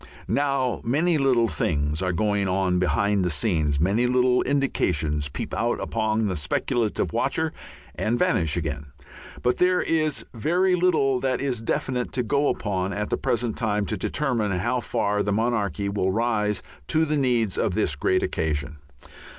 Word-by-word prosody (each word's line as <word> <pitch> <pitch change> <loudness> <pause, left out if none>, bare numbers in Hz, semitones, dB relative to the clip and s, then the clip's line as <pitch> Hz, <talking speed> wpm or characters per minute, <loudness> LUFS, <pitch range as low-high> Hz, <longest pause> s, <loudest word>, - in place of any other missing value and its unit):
Now 135 -3 0
many 160 +8 +2 0.3
things 75 -2 -1
are 90 -1 0
going 100 +2 0
on 90 -1 +1
behind 100 +2 +1
the 90 - +1
scenes, 75 -5 0
many 100 +9 +2
little 125 0 +3
indications 80 - 0
peep - - -6
out 120 +1 0
upon 110 -1 0
the 95 -3 -1
speculative 110 - -1
watcher - - 0 0.4
and 115 +3 -1
vanish 90 - +1
again; 75 -3 -3 0.6
but 125 - +1
there 180 0 +3
is 155 -3 0
very 175 - +1
little 160 -8 +2
that 130 0 0
is 130 -5 -2
definite 125 +2 -2
to 125 - 0
go 140 +5 +1
upon 95 -2 -1
at 105 +1 -3
the - - +3
present 120 -2 -1
time 105 -3 0
to - - -2
determine 120 -8 -1
how 125 +7 0
far 105 -2 0
the 100 - -1
monarchy 105 -4 0
will 100 -2 0
rise 105 -2 0 0.2
to 160 0 +2
the 155 0 0
needs 120 -7 +1
of - - 0
this - - +1
great - - +1
occasion. 75 -1 -2
110 Hz, 160 wpm, -24 LUFS, 95-130 Hz, 0.6 s, little